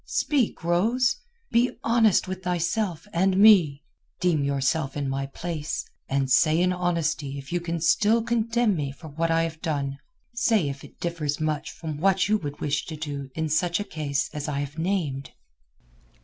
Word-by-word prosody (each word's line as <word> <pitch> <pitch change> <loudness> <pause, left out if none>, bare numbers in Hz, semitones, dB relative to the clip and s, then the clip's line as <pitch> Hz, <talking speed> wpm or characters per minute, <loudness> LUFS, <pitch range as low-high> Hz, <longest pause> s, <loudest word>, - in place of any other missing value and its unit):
Speak, 265 - 0
Rose! 225 +10 +2 0.3
Be 240 +2 +2
honest 225 -5 +3
with 185 0 -5
thyself 180 +1 -1
and 185 +2 +2
me. 180 -9 +6 0.4
Deem 170 -5 +2
yourself 140 +1 0
in 140 -1 -2
my 135 0 -2
place, 160 +1 -4 0.2
and 135 0 +1
say 155 +5 +4
in 180 +1 +2
honesty 165 -5 -1
if 135 +3 -8
you 175 - +1
can 170 0 -3
still 210 +7 +3
condemn 230 -2 +1
me 145 -4 -2
for 155 +3 -11
what 165 +3 -1
I 165 0 +3
have 160 -1 -5
done. 140 -3 -2 0.3
Say 220 -9 +2
if 140 0 -7
it - - -15
differs 160 -4 -2
much 155 -1 -1
from 155 -3 -6
what 190 +2 +3
you 215 0 +2
would 145 -4 -6
wish 150 0 -1
to 160 - -5
do 145 -3 -5
in 160 0 -1
such 170 +4 +1
a - - -1
case 150 -7 -2
as 150 0 -4
I 140 -1 -1
have 145 +3 -6
named." 160 -7 -2
165 Hz, 175 wpm, -25 LUFS, 145-190 Hz, 0.4 s, me